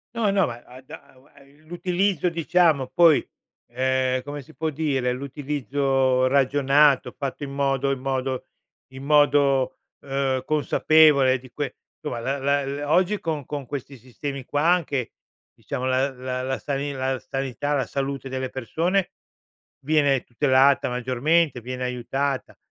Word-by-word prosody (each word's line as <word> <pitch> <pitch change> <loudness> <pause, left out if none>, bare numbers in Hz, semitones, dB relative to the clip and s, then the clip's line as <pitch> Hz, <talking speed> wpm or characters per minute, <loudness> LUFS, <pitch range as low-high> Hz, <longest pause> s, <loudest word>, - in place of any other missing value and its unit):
No, 225 -3 +1
no, 195 -2 +3
ma 120 0 -8
ad 130 +2 -15
a 140 -4 -13
ua 135 +3 -23
i 140 +1 -23
l'utilizzo 180 +1 0
diciamo, 165 -4 +2
poi, 160 +2 +4 0.4
ehm, 130 +1 0
come 145 +1 -6
si 155 +4 -17
può 160 0 -2
dire, 140 -5 -1
l'utilizzo 135 -1 0
ragionato, 140 +1 +3
fatto 140 0 -4
in 140 - -5
modo 140 -1 0
in 135 - -2
modo 130 -1 -2 0.5
in 130 0 -9
modo, 140 -3 +3 0.3
uhm, 135 -1 -1
consapevole 150 -3 +4
di 130 -1 -16
que 145 -3 -4 0.2
insomma, 150 -6 -5
la 135 +4 -2
la 140 +1 0
l 140 +1 -4
oggi 185 +6 +2
con 155 -4 -3
con 145 0 -5
questi 135 +1 -7
sistemi 130 +2 -7
qua 145 +3 -1
anche, 160 -8 +1 0.4
diciamo, 130 - -5
la 130 +1 +1
la 130 0 -5
la 130 +1 -2
sani 140 0 -3
la 130 -1 -2
sanità, 135 +2 -3
la 135 -3 0
salute 135 0 -4
delle 130 0 -3
persone 170 - -1 0.7
viene 145 -4 +2
tutelata 135 +2 +3
maggiormente, 130 +4 +1
viene 125 +2 -5
aiutata. 130 +2 -3
140 Hz, 145 wpm, -24 LUFS, 130-150 Hz, 0.7 s, poi